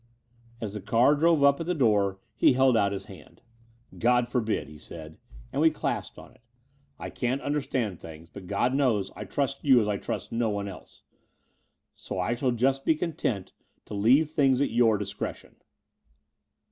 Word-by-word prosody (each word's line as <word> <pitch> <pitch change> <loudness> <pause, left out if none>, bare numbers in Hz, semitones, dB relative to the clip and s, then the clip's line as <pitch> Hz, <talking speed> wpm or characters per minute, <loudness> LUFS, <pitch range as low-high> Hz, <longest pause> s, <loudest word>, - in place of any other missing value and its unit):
As 105 -3 -5
the 105 - -6
car 115 +8 +3
drove 160 0 +3
up 140 0 +5
at 165 - -4
the 180 - 0
door 105 -8 +2 0.2
he 120 - +4
held 130 -1 +4
out 100 -2 +2
his 100 - -5
hand. - - -15 0.6
"God 120 +1 +3
forbid," 115 -3 -1
he 75 0 -13
said; 80 0 -11 0.3
and 145 - 0
we 160 - +6
clasped 155 - -4
on - - -13
it - - -25 0.6
"I - - -7
can't 125 +2 -1
understand 135 - -2
things: 80 0 -11
but 95 +1 -11
God 110 +6 0
knows 115 -9 +1
I - - -7
trust 140 -1 -2
you 130 -4 +6
as 105 - 0
I 105 -1 0
trust - - -5
no 115 -1 0
one 100 -1 -3
else. 95 - -12 0.9
So - - -7
I 90 +6 0
shall 125 +2 -1
just 130 +3 +1
be 160 - +3
content 150 - -3 0.3
to - - -9
leave 130 +10 +3
things 135 -5 +3
at 140 - +1
your 115 -2 +3
discretion." 100 -1 -6
120 Hz, 180 wpm, -27 LUFS, 100-140 Hz, 0.9 s, we